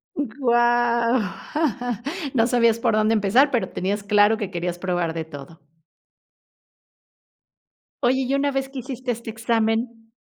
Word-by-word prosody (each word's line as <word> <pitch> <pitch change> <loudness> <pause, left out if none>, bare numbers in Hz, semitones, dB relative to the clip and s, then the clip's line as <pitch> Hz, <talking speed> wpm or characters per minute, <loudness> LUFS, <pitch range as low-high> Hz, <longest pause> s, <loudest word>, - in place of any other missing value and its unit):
Guau. 240 -3 +2 1.2
No 230 -3 +3
sabías 235 -2 +3
por 230 - +1
dónde 215 +1 +2
empezar 225 +7 +4
pero 240 - 0
tenías 200 +2 -2
claro 210 +1 +4
que 205 -4 -4
querías 175 -1 -3
probar 175 -3 -1
de 165 -1 -4
todo. 150 +1 -11 2.4
Oye, 260 +1 +2
y 260 +1 -1
una 280 +1 +1
vez 270 0 -2
que 270 -1 -7
hiciste 255 0 -4
este 230 -1 -6
examen. 225 0 -1
230 Hz, 130 wpm, -23 LUFS, 205-245 Hz, 2.4 s, empezar